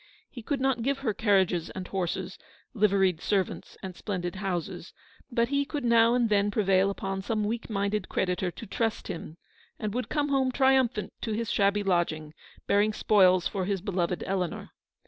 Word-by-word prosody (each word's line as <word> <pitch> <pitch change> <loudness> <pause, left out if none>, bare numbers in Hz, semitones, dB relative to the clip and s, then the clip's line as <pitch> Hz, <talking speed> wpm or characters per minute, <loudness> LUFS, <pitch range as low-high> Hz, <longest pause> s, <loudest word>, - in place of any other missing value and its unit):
He 245 - -8
could 275 +4 -2
not 265 -2 +1
give 275 +3 0
her 220 - +1
carriages 190 -5 +2
and 185 -1 -6
horses, 190 0 -3 0.3
liveried 195 -6 +2
servants 195 -3 -2
and 185 -2 -6
splendid 180 -3 -4
houses, 185 -2 -4 0.4
but 235 0 +1
he 280 0 +2
could 285 -2 -4
now 235 0 +5
and 245 -2 +3
then 205 -1 +2
prevail 195 -2 +2
upon 195 -1 -3
some 215 +2 -1
weak 230 +3 -3
minded 200 -1 -1
creditor 180 0 0
to 200 - -9
trust 225 +2 -2
him, 165 -1 -6 0.4
and 210 -2 -3
would 250 +1 -3
come 295 -1 0
home 265 -2 +2
triumphant 260 -4 +2
to 220 - -2
his 225 0 -2
shabby 200 0 +2
lodging, 170 -5 0 0.3
bearing 205 +2 +3
spoils 185 -5 +4
for 190 -1 -3
his 200 0 -1
beloved 180 -2 -2
Eleanor. 185 -3 -3
200 Hz, 170 wpm, -28 LUFS, 185-230 Hz, 0.4 s, now